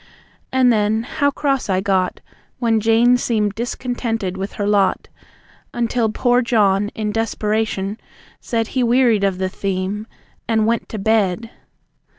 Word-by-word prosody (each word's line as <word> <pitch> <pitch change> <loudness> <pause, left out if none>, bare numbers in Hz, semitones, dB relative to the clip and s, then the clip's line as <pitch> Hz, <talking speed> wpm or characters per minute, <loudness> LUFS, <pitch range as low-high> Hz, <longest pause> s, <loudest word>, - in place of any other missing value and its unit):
And 255 -2 +4
then, 215 +1 +1
how 285 +4 0
cross 275 -4 -1
I 185 -1 +2
got 190 -2 0 0.4
When 230 -3 +1
Jane 230 +3 +4
seemed 215 -4 0
discontented 230 -3 -3
with 195 +1 -5
her 205 - -3
lot. 200 -2 +1 0.7
Until 235 -1 0
poor 245 +3 +2
John 205 -4 +2
in 215 -1 -2
desperation 215 -2 -1 0.4
said 225 -1 -2
He 260 - -1
wearied 240 -3 +3
of 195 -2 +1
the 190 0 -1
theme 195 +2 -3 0.4
and 220 -2 +2
went 230 +1 0
to 220 - -5
bed! 220 +1 0
220 Hz, 140 wpm, -20 LUFS, 200-235 Hz, 0.7 s, And